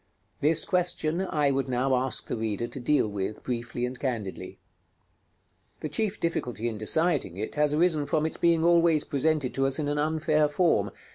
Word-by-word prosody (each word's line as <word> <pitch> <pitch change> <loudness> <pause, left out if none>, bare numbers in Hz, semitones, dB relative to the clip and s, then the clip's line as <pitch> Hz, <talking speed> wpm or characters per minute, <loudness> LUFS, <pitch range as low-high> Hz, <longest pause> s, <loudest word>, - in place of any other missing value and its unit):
This 155 +2 +2
question 175 -2 0
I 145 -2 +2
would 135 0 -1
now 130 +2 +1
ask 130 +1 0
the - - -3
reader 110 0 -2
to 125 - -6
deal 140 -1 +2
with 105 0 -4
briefly 120 0 -3
and 125 0 -6
candidly. 115 -8 -4 1.2
The 155 - -3
chief 210 +6 -1
difficulty 125 -8 -2
in 110 -3 -4
deciding 145 - 0
it 110 +2 -4
has 150 0 +2
arisen 155 -3 +2
from 155 0 +1
its 160 - -2
being 170 -1 +3
always 170 -3 +4
presented 150 -2 0
to 135 0 +1
us 135 - -1
in 150 - -2
an 145 0 -1
unfair 155 0 +1
form. 170 +3 +2
145 Hz, 180 wpm, -27 LUFS, 125-160 Hz, 1.2 s, always